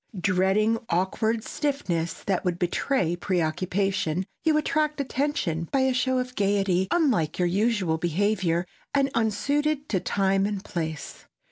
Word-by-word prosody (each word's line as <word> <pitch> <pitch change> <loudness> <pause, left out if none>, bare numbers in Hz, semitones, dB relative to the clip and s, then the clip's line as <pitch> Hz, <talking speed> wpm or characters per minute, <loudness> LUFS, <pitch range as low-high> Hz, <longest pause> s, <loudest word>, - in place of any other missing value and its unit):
Dreading 195 +5 +2
awkward 215 +6 0
stiffness 195 - -2
that 190 -3 0
would 180 -2 0
betray 175 0 0
preoccupation, 180 0 -1 0.2
you 315 -2 +3
attract 305 -1 0
attention 255 - -1
by 270 - +2
a 260 0 +2
show 255 0 +1
of 250 0 -2
gaiety 195 -2 +1
unlike 255 - +1
your 180 - +2
usual 190 -4 +1
behavior 175 0 +1 0.3
and 275 -1 +2
unsuited 285 +7 0
to 190 - +1
time 195 +1 +1
and 205 -1 -4
place. 160 -3 -5
195 Hz, 130 wpm, -26 LUFS, 175-255 Hz, 0.3 s, you